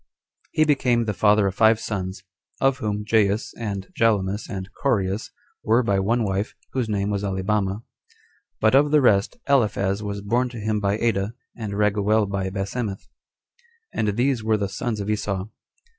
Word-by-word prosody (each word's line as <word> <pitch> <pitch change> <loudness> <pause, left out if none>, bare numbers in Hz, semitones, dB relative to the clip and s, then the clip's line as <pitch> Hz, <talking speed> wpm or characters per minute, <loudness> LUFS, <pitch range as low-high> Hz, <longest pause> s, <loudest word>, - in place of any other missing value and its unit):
2. - - +2
He - - +6
became 125 -5 +2
the 105 - -1
father 105 +1 +4
of 95 - 0
five 110 +2 +4
sons; 95 -3 -4 0.4
of 135 -1 +2
whom 105 -1 -2
Jaus, 105 -1 +1
and 100 -4 -4
Jalomus, 105 -2 +1
and 95 -4 -5
Coreus, 100 -6 0 0.3
were 115 +3 +3
by 100 -4 +1
one 115 +5 +1
wife, 100 +1 -2 0.2
whose 125 -4 -1
name 100 -1 0
was 100 0 -1
Alibama; 100 +1 -1 0.8
but 110 +2 +3
of 145 +2 +5
the 150 0 +5
rest, 100 -7 +3
Aliphaz 105 -7 +2
was 100 -1 -4
born 120 +5 0
to 120 - -9
him 110 0 -1
by 100 0 0
Ada, 110 -1 0 0.2
and 110 -4 -5
Raguel 105 +1 +2
by 95 -1 -2
Basemmath: 100 +2 -4 0.8
and 105 -1 -1
these 125 -2 +1
were 110 0 +2
the 100 -2 -2
sons 110 +2 -3
of 100 - -4
Esau. 105 -2 -2
105 Hz, 170 wpm, -23 LUFS, 100-115 Hz, 0.8 s, He